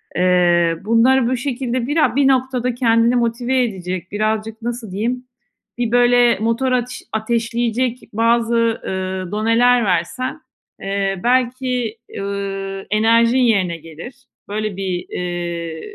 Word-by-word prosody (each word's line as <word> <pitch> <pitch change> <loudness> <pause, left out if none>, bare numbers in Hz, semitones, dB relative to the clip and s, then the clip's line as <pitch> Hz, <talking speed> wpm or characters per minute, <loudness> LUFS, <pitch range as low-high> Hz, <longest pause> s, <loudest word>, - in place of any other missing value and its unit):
Eee, 175 -2 +3
bunları 235 +3 +4
bu 255 - 0
şekilde 250 -1 -2
bira 300 -2 +2
bir 280 -1 +4
noktada 255 -2 +1
kendini 230 -1 +3
motive 245 +2 +1
edecek, 185 -5 -4
birazcık 215 +2 -2
nasıl 235 -3 -5
diyeyim, 240 +6 -2 0.5
bir 240 -2 -1
böyle 245 0 +4
motor 230 +4 0
ateş 250 0 -2
ateşleyecek 235 +2 -1
bazı, 230 +1 +2 0.3
ııı, 185 -1 -3
doneler 230 +3 +3
versen, 195 - -1 0.4
eee, 195 -1 -1
belki, 250 -2 0 0.2
ııı, 195 -1 -4
enerjin 230 +3 +4
yerine 200 -9 +2
gelir. 165 - -10 0.3
Böyle 210 -1 -3
bir, 185 -2 -3
eee, 170 -2 -4
230 Hz, 115 wpm, -19 LUFS, 195-245 Hz, 0.5 s, bunları